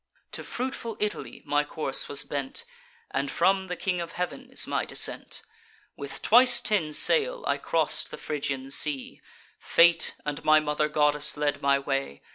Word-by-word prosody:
To - - -5
fruitful 245 -3 -4
Italy 210 0 -4
my 145 0 +1
course 145 -2 -1
was 145 - 0
bent; 140 -2 -5 0.5
And 135 +1 -1
from 190 +5 +1
the 180 - -4
King 180 -1 -2
of 170 -1 -7
Heav'n 180 0 -5
is - - 0
my - - -1
descent. - - -1 0.5
With 140 -1 -7
twice 245 +2 +6
ten 170 -8 0
sail - - +3
I - - +1
cross'd - - -1
the - - -8
Phrygian 135 -3 -4
sea; 140 -1 -2 0.4
Fate 170 0 +3
and 145 -1 -4
my 155 0 +6
mother 150 0 -1
goddess 150 0 +2
led 145 -1 -1
my 140 0 +3
way. 135 - -3
150 Hz, 160 wpm, -27 LUFS, 140-190 Hz, 0.5 s, twice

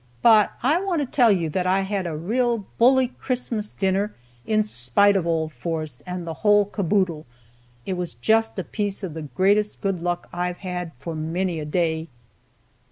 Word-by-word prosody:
"But 215 -3 +6
I 305 +8 +3
want 370 -5 0
to - - 0
tell 245 -3 +4
you 175 -5 +1
that 180 +2 -1
I 190 +1 +3
had 195 -2 -2
a 160 -2 -4
real 230 +5 0
bully 255 +1 +5
Christmas 240 -5 -2
dinner, 195 +2 0 0.3
in 215 -1 +3
spite 200 - +2
of 180 -3 0
old 160 -2 0
Forrest 155 0 -4
and 180 -1 -4
the 165 - -4
whole 205 -1 +5
caboodle. 185 - -1 0.6
It 190 - -2
was 180 -8 -4
just 225 - +1
a 190 - -2
piece 205 +1 -3
of 180 -5 -4
the 160 - -6
greatest 195 +9 +1
good 195 -4 -2
luck 175 0 -2
I've 180 0 -2
had 180 -3 -5
for 150 +6 -6
many 165 +2 -2
a 150 - -4
day. 160 0 0
190 Hz, 180 wpm, -23 LUFS, 165-210 Hz, 0.6 s, But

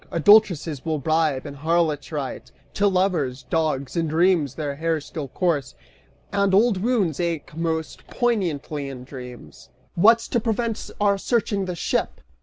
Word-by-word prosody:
Adultresses 170 -5 +4
will 160 -2 -1
bribe, 155 -1 0
and 140 -1 -8
harlots 160 -1 0
write 145 -4 -5 0.2
To 205 - +2
lovers: 175 -10 0
dogs, 155 -3 -1
in 165 -1 0
dreams 160 -4 +2
their 145 -2 -3
hare 165 0 0
still 145 0 -6
course; 150 - -1 0.6
And 200 -1 +2
old 210 -2 +3
wounds 205 - +1
ache 165 -4 -3
most 160 -1 -3
poignantly 160 - -1
in 130 -2 -8
dreams!" 125 -2 -10 0.3
"Still, 170 - -3
what's 230 +2 +6
to 240 - +1
prevent 225 0 -2
our 200 -1 +2
searching 205 -3 0
the 180 -1 -4
ship?" - - -1
165 Hz, 150 wpm, -23 LUFS, 145-200 Hz, 0.6 s, what's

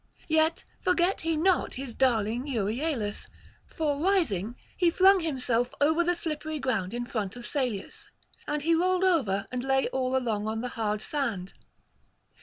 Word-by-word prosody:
Yet 315 +1 +2 0.2
forgot 365 +1 +2
he 325 -1 0
not 360 +3 +2
his 260 -2 -5
darling 240 0 +1
Euryalus; 230 -1 -2 0.4
for 295 -3 -2
rising, 240 - +1 0.2
he 350 -2 +3
flung 380 +3 +5
himself 255 -7 -1
over 320 +4 +3
the 350 +1 +1
slippery 310 -2 -3
ground 230 -7 -1
in 240 0 -3
front 215 -5 -3
of 245 -1 -8
Salius, 280 - -3 0.4
and 295 -1 -2
he 330 +2 +3
rolled 365 +2 +2
over 255 - +2
and 250 -1 -3
lay 270 0 +1
all 260 0 0
along 220 -5 -1
on 220 +1 -2
the 250 - -3
hard 215 -2 -2
sand. 225 -11 -3
270 Hz, 155 wpm, -28 LUFS, 225-325 Hz, 0.4 s, flung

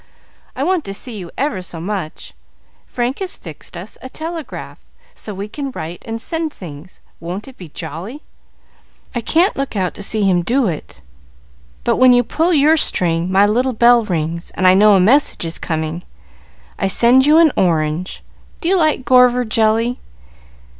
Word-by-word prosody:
I 265 - -2
want 360 0 +1
to 195 - -6
see 235 +3 -7
you 175 -2 -8
ever 260 -9 -1
so 180 -2 -8
much. 175 - -5 0.5
Frank 245 +2 -2
has 385 -2 -4
fixed 165 +1 -10
us 185 +5 -10
a 260 - -8
telegraph, 320 +2 -7 0.3
so 215 - -7
we 200 +1 -5
can 275 +5 -5
write 170 -8 -7
and 225 0 -4
send 325 +6 -3
things. 165 - -12 0.2
Won't 180 +7 -6
it 265 - -12
be 180 -8 -11
jolly! 185 - -7 0.9
I 240 - -2
can't 340 - +2
look 275 -4 -4
out 185 -3 -1
to - - -9
see 210 +1 0
him 185 -3 +3
do 245 +8 +1
it; 150 - -5 0.8
but, - - +1
when 255 -1 +6
you 245 0 +4
pull 325 +9 0
your 310 0 +4
string, 175 - +1
my 195 +2 +5
little 250 +5 +1
bell 240 +1 +5
rings, 170 -3 -3
and 185 - 0
I 185 - +7
know 205 +2 +6
a - - +4
message 235 0 +3
is 165 - -4
coming. 160 +1 -3 0.8
I - - +1
send 245 +7 +4
you 305 +2 +6
an 330 -2 +6
orange. 165 0 0 0.4
Do 335 - -1
you 385 - +3
like 310 -6 +1
gorver 250 0 +4
jelly? 225 +2 +1
220 Hz, 175 wpm, -18 LUFS, 180-265 Hz, 0.9 s, I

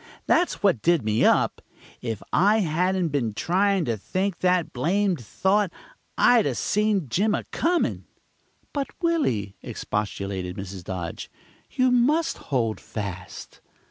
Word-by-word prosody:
That's 355 - +1
what 185 - +3
did 170 -8 +2
me 110 +1 +2
up. - - +3 0.4
If 115 -4 -4
I 210 +4 +4
hadn't 180 +1 +1
been 120 -8 -1
trying 190 - +1
to 115 -3 -1
think 185 - -2
that 180 -2 +1
blamed 180 +3 0
thought, 190 - +1 0.5
I'd 240 -3 +5
'a' - - -1
seen 210 -6 +1
Jim 205 - +1
a - - -3
comin'." 345 +2 0 0.7
"But, 280 -2 -1 0.2
Willy," 120 - 0
expostulated 100 -3 -4
Mrs. 95 -1 -7
Dodge, 90 -3 -5 0.4
"you 255 0 +2
must 290 +7 +2
hold 115 -6 0
fast." 95 -4 -7
175 Hz, 130 wpm, -25 LUFS, -, 0.7 s, I'd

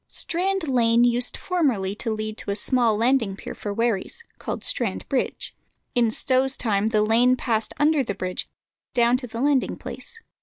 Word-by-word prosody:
Strand 370 0 -2
Lane 235 -3 +3
used 245 0 +2
formerly 260 - 0
to 225 - -3
lead 215 0 -3
to - - -4
a 200 - 0
small 230 0 +2
landing 230 -3 +1
pier - - -8
for 205 - -6
wherries, 230 - -2 0.2
called - - -5
Strand - - -1
Bridge. - - -2 0.4
In 240 -2 +3
Stow's 260 +4 +2
time 210 -3 0
the 215 -1 +2
lane 235 +4 +4
passed 225 -3 -1
under 300 +1 +3
a 225 -7 -1
bridge 185 -1 -4 0.5
down 240 0 +4
to 250 -1 -1
the 230 0 -7
landing 280 -2 +1
place. 455 - -8
235 Hz, 175 wpm, -24 LUFS, 215-265 Hz, 0.5 s, lane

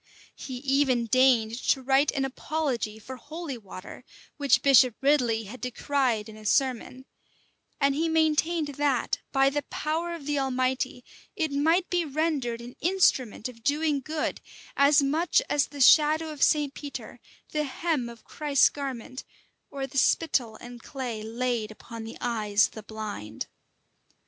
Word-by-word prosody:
[*] - - -25
He 260 - -7
even 265 -2 +1
deigned 240 -1 +3
to 265 - +3
write 270 +3 +3
an 270 -1 0
apology 265 -5 -3
for 255 +4 -9
"holy 305 +1 -7
water," 190 -3 -10 0.3
which 285 -2 +3
Bishop 255 -4 +6
Ridley 250 -6 +2
had 225 +5 -10
decried 250 -3 -1
in 220 - -11
a 215 - -13
sermon; 255 +2 0 0.7
and 280 -1 +3
he 325 +4 0
maintained 320 0 +1
that, 285 -4 +1
by 270 0 +3
the 290 +1 -1
power 325 +4 -3
of 310 -4 -10
the 295 -1 0
Almighty, 255 -1 -1 0.3
it 320 -6 -1
might 325 +6 +2
be 350 -1 +2
rendered 285 -6 -1
an 240 +1 -10
instrument 275 - +2
of 230 -2 -13
doing 295 +1 +1
good, 305 +3 -3 0.3
as 280 +1 +5
much 315 +9 +2
as 285 -2 +2
the 285 - -11
shadow 310 +3 +5
of 295 -2 -9
St. 295 -2 +3
Peter, 285 -1 -8 0.3
the 300 -1 0
hem 295 -4 -2
of 235 -1 -13
Christ's 290 -3 +2
garment, 265 -2 -6 0.5
or 275 -1 -4
the 270 0 -1
spittle 255 -10 +1
and 240 +1 -11
clay 245 -5 -5
laid 230 0 -2
upon 225 +1 -9
the 225 - -8
eyes 215 -4 +2
of - - -6
the 220 - -9
blind. 210 - -6
270 Hz, 155 wpm, -27 LUFS, 235-295 Hz, 0.7 s, Bishop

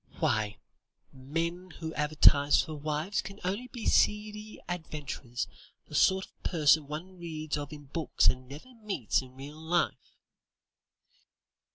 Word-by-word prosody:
Why, 110 -9 +1 0.6
men 165 +7 -3
who 160 -1 -4
advertise 150 -1 +5
for 160 - -1
wives 155 +6 -1
can 200 0 -9
only 200 +7 -2
be 240 -3 -7
seedy 210 +1 +2
adventurers, 150 -7 -4 0.4
the - - -15
sort 190 0 +4
of - - -30
person 155 -3 +4
one 175 +5 -7
reads 155 -3 -3
of 145 -1 -4
in 145 -1 -9
books 155 +2 0
and 130 0 +3
never 155 - -10
meets 200 - 0
in 130 -1 -13
real 145 +3 -9
life." 170 +2 -1
155 Hz, 135 wpm, -30 LUFS, 145-185 Hz, 0.6 s, advertise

